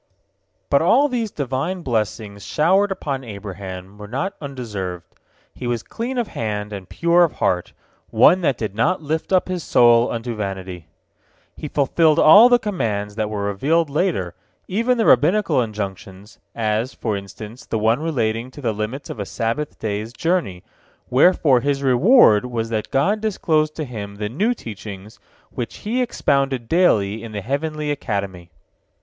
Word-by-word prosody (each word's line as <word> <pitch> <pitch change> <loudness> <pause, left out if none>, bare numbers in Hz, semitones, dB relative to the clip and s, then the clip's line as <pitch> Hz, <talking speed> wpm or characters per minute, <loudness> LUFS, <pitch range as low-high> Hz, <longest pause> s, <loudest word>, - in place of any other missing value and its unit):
But 140 - +4
all 255 - +4
these 240 -5 -2
Divine 145 +5 -3
blessings 105 -4 -3
showered 190 +6 +2
upon 140 -8 -3
Abraham 100 -2 -8
were 105 - -8
not 140 - -3
undeserved. 105 - -5 0.5
He 125 - -6
was 120 -2 -2
clean 245 +3 -5
of 235 -3 -1
hand, 105 -1 -4
and 95 -2 -8
pure 170 +1 +3
of 165 - +1
heart, 90 -1 -1 0.4
one 185 - +5
that 140 -7 +1
did 110 -4 -4
not 160 - 0
lift 155 +4 -3
up 185 -1 +3
his 180 -3 -3
soul 120 0 +4
unto 115 +1 -4
vanity. 95 -5 -6 0.7
He 150 - -6
fulfilled 150 +2 +2
all 205 +10 +8
the 245 - +6
commands 115 - -3
that 110 0 -2
were 105 -1 -3
revealed 140 +11 0
later, 145 - -1 0.3
even 230 +6 +1
the 225 - +1
Rabbinical 160 - +4
injunctions, 100 -2 -6 0.2
as, 110 +2 -1
for 110 -3 -2
instance, 105 +4 -9
the 115 - -1
one 110 +4 +2
relating 120 -7 -1
to 145 +3 -12
the 115 -4 -1
limits 110 +7 -5
of - - -8
a 100 - -3
Sabbath 125 +6 -3
day's 105 +1 -4
journey, 165 - -1 0.5
wherefor 140 -1 +4
his 140 +1 -1
reward 130 - +5
was 115 -2 -3
that 110 -2 -3
God 200 +11 +1
disclosed 155 -8 0
to 155 - -4
him 105 -5 -7
the 105 0 -4
new 210 - 0
teachings 105 - -9 0.3
which 120 - -5
He 240 +4 0
expounded 140 - 0
daily 110 - +2
in 115 -2 -8
the 105 - -4
heavenly 150 +5 -2
academy. 100 -10 -4
125 Hz, 160 wpm, -21 LUFS, 105-160 Hz, 0.7 s, all